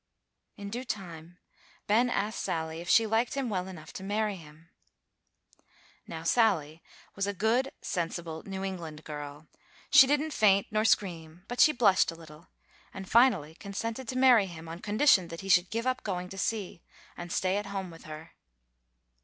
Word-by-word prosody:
In 200 0 -7
due 245 +3 -4
time 175 -7 -7 0.5
Ben 235 +4 +3
asked 215 -1 -2
Sally 160 0 -3
if 175 - -8
she 225 - +5
liked 225 +4 0
him 270 -3 -2
well 185 -2 -2
enough 160 -5 -10
to - - -7
marry 210 +1 -1
him. 160 -1 -15 1.4
Now 160 0 -7
Sally 170 -6 +1 0.3
was 195 0 -1
a 200 - -3
good, 235 +7 +1
sensible 165 -2 -4
New 195 0 -5
England 165 -5 -6
girl: 145 0 -8 0.5
she 280 -2 +9
didn't 295 +2 0
faint 200 -2 +4
nor 215 0 +1
scream, 170 -4 -1
but 245 - -6
she 305 - +7
blushed 210 -9 +3
a 165 - -5
little, 160 0 -14 0.4
and 190 -1 -8
finally 210 - +3
consented 225 +7 -5
to 255 - -3
marry 250 -6 +5
him, 165 -2 -10
on 165 +1 -7
condition 205 -2 +3
that 165 0 -8
he 195 - -8
should 180 -1 +4
give 230 +2 -3
up 255 0 0
going 180 -3 -4
to 195 - -9
sea, 200 -5 -3 0.3
and 175 0 -8
stay 185 +2 0
at 205 0 -4
home 195 -2 -5
with 165 - -14
her. 155 +1 -9
190 Hz, 175 wpm, -29 LUFS, 165-220 Hz, 1.4 s, she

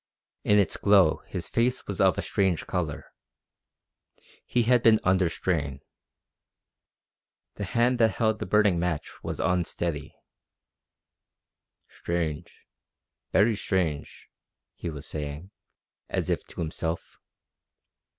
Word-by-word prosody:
In 105 - +4
its 100 -4 +2
glow 100 -6 +4
his 85 -2 -3
face 120 +7 0
was 100 - -3
of 95 -2 +4
a - - -2
strange 95 -4 0
colour. 80 -5 -3 1.4
He 120 - +2
had 120 +1 +4
been 110 -2 +6
under 95 -2 +3
strain. 75 -6 -2 1.8
The 100 - -3
hand 120 +5 +1
that 110 -4 +3
held 110 -1 +1
the - - -4
burning 105 -5 +3
match 85 -3 -2
was - - -5
unsteady. 85 -4 -1 1.7
"Strange, 85 -1 -3 0.8
very 110 +3 +4
strange," 90 -8 -2 0.5
he 85 - -5
was 75 -3 -7
saying, 75 +5 -5 0.6
as - - -1
if - - -2
to - - -7
himself. 80 +1 -4
90 Hz, 110 wpm, -27 LUFS, 80-105 Hz, 1.8 s, been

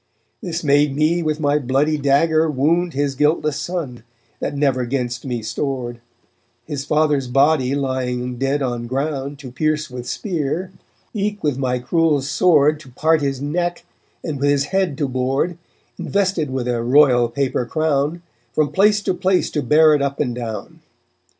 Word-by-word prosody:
This 170 -2 -4
made 145 -1 +3
me 155 +4 +2
with 155 -1 -1
my 145 -1 +2
bloody 140 +3 +1
dagger 155 +3 +2
wound 165 +5 +1
His 140 0 0
guiltless 150 +1 +1
son, 155 -9 -4 0.4
that 145 - -3
never 135 -3 +1
'gainst 120 -1 -3
me 120 -4 -3
stored; 120 0 -3 0.6
His 145 -3 -5
father's 150 -3 +1
body 135 +1 +2
lying 125 -2 -2
dead 135 +1 0
on 120 -2 -3
ground 140 +2 -3
To 135 -3 -10
pierce 155 +1 -1
with 125 -1 -7
spear, 175 -1 -3 0.4
eke 210 0 -2
with 145 -4 0
my 125 -2 0
cruel 150 +2 +1
sword 150 0 +3
To 150 -4 -14
part 155 +5 +1
his 140 -1 -2
neck, 175 +4 -2 0.4
and 150 -4 -4
with 145 +1 +2
his 140 -1 +2
head 180 -2 -1
to 145 - 0
board, 135 +7 -1 0.4
Invested 190 -7 0
with 130 -2 -3
a 120 -1 0
royal 125 -1 +4
paper 130 -1 -1
crown, 155 +2 0 0.3
From 155 -2 +1
place 205 +1 +3
to - - 0
place 185 +1 +1
to 150 - -1
bear 155 +4 +5
it 145 - +2
up 140 0 -2
and 125 -5 0
down. 115 -4 -6
145 Hz, 165 wpm, -20 LUFS, 130-155 Hz, 0.6 s, bear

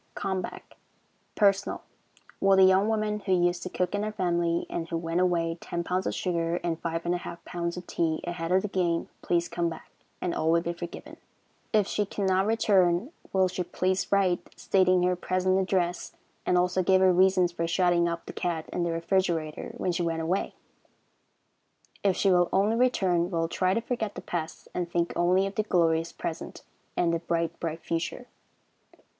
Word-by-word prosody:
Come 190 -1 -2
Back. - - -9 0.6
Personal. 200 -1 +2 0.6
Will 195 0 +5
the 190 - +7
young 190 +2 +5
woman 215 -1 0
who 195 -2 0
used 175 -1 +2
to 185 - -5
cook 180 +1 -2
in 205 0 0
our 215 - -2
family, 175 -4 0
and 165 -1 -4
who 165 - -1
went 165 +1 -1
away 170 -2 +1
ten 170 0 -3
pounds 185 +2 -1
of - - -2
sugar 170 -2 -1
and 165 -2 -1
five 165 0 -3
and 175 - +1
a 175 - -1
half 170 - -9
pounds 170 0 -3
of 180 - -7
tea 160 -2 -1
ahead 175 -1 -4
of 185 +1 +3
the - - -1
game, 175 -4 0
please 170 0 +1
come 170 -1 -1
back, 165 - -10 0.3
and 175 - -2
all 160 - 0
will 170 +1 +4
be 170 0 -3
forgiven. 170 0 -8 0.5
If 210 -2 +3
she 205 +1 -1
cannot 190 -1 +1
return, 200 - +2 0.2
will 190 -1 +3
she 180 0 -3
please 185 +1 -1
write, 190 -3 +2
stating 185 -2 +3
her 180 0 +2
present 185 +1 +1
address, 180 -2 -1 0.3
and 180 - +3
also 180 +1 +2
give 190 +1 +4
her 185 -1 +5
reasons 185 -1 +4
for 170 -1 -2
shutting 170 0 +2
up 170 0 -5
the - - -8
cat 165 -3 -2
in 180 - -1
the 170 - 0
refrigerator 165 -2 -1
when 180 - 0
she 175 - -1
went 165 -1 -1
away? 185 +5 -1 1.5
If 195 -2 +2
she 195 - +3
will 175 -1 +4
only 205 +4 +2
return, 190 -8 +2
we 175 -1 -3
will 165 0 +1
try 185 +2 +1
to 230 - +1
forget 225 -3 -3
the - - -6
past, 165 -2 -5
and 175 -1 -2
think 170 0 0
only 180 +2 +3
of 195 - -4
the 215 - +1
glorious 165 -5 +1
present 165 - -6 0.3
and 170 -1 +2
the 165 - 0
bright, 170 0 -2
bright 165 -1 -4
future. 170 +9 -3
180 Hz, 195 wpm, -27 LUFS, 170-190 Hz, 1.5 s, the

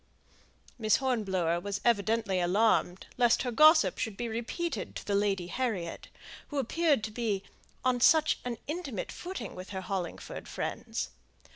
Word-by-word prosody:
'" - - -29
Miss 215 -2 +4
Hornblower 190 -10 0
was 200 +2 -3
evidently 220 -3 +2
alarmed 185 0 +2
lest 240 -1 +4
her 250 - -2
gossip 310 +5 +6
should 220 -5 -3
be 240 - -2
repeated 240 +10 -3
to - - -6
the 205 - -1
Lady 200 -3 +1
Harriet, 190 -5 -3 0.4
who 290 - -5
appeared 285 -1 +2
to 215 - -3
be 215 -4 -1 0.4
on 255 -1 +3
such 315 +4 +5
an 245 -2 -3
intimate 290 - -4
footing 370 +2 -6
with 185 +1 -9
her 190 -2 -4
Hollingford 185 -2 -5
friends. - - -3
225 Hz, 150 wpm, -30 LUFS, 195-255 Hz, 0.4 s, gossip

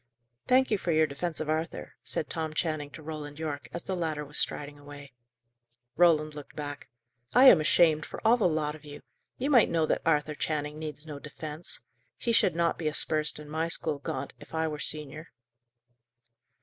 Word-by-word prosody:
"Thank 260 0 +4
you 210 - +2
for 175 - -1
your 155 0 +4
defence 155 +3 -3
of 155 - -3
Arthur," 160 +2 -3
said 155 - -2
Tom 160 -1 -3
Channing 155 -3 -1
to 155 - -11
Roland 150 -2 -6
Yorke, 150 -3 -4
as 170 - -6
the 190 - -3
latter 155 -4 -2
was 150 +1 -1
striding 145 0 -2
away. 145 -1 -11 0.8
Roland 155 -3 +4
looked 145 -1 -10
back. 145 -1 -6 0.5
"I 255 +2 +8
am 185 -12 +9
ashamed 155 0 +4
for - - -7
all 225 +2 +7
the 225 -6 +2
lot 155 -2 0
of 155 0 -13
you! 145 -1 -10 0.3
You 275 +4 -1
might 245 -6 +6
know 165 -2 +2
that - - 0
Arthur 150 -1 +2
Channing 150 0 -3
needs 155 -1 -6
no 150 -2 -7
defence. 150 +2 -3 0.4
He 235 - -1
should 190 -6 +4
not 170 0 +1
be 160 - -1
aspersed 155 0 +2
in 150 0 -10
my 160 +2 -1
school, 155 -3 -2
Gaunt, - - -4
if - - -11
I 160 0 +1
were 150 -1 -4
senior." 155 +1 -4
155 Hz, 190 wpm, -29 LUFS, 150-165 Hz, 0.8 s, am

